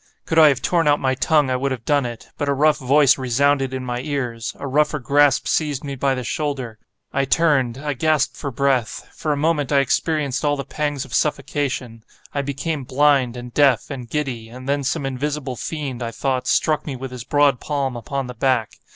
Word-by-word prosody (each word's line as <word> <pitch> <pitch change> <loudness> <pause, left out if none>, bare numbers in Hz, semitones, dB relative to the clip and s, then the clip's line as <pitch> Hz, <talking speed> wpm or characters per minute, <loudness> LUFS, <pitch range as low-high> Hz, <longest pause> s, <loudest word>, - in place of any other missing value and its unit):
Could 160 - +2
I 155 - +9
have 140 -3 +1
torn 170 -3 +2
out 145 0 +4
my 130 -1 +1
tongue, 140 +1 +2
I - - +1
would 135 +2 -1
have 125 -3 -5
done 145 -4 +2
it, 120 -2 -9
but 145 - -2
a 140 - +2
rough 150 +2 +3
voice 140 +1 +4
resounded 135 +2 +1
in 130 -1 -4
my 120 -1 -3
ears—a 125 -3 -4
rougher 150 +3 +2
grasp 145 +1 +3
seized 150 -3 0
me 140 -1 -4
by 135 0 0
the 125 - -4
shoulder. 130 -4 -3 0.3
I 135 0 +1
turned—I 145 -2 +1
gasped 150 +2 +1
for 140 - -4
breath. 130 -3 0
For 155 - -2
a 145 - 0
moment 150 -2 0
I 140 - +4
experienced 140 0 0
all 145 -1 +2
the 140 -2 -5
pangs 145 -1 -2
of - - -12
suffocation; 135 -6 -1 0.3
I 140 - 0
became 140 +2 -3
blind, 130 -2 +2
and 120 0 -8
deaf, 140 -3 +3
and 125 -4 -7
giddy; 125 -7 -3
and 130 +2 -10
then 140 0 0
some 140 +2 -1
invisible 135 0 -3
fiend, 135 -2 -5
I 115 - -2
thought, 130 +1 -2
struck 155 0 +1
me 140 - -3
with 130 0 -7
his 125 -2 -7
broad 145 -1 +3
palm 140 -4 -2
upon 135 +3 -4
the 125 - -7
back. 125 -2 +1
140 Hz, 205 wpm, -21 LUFS, 125-145 Hz, 0.3 s, I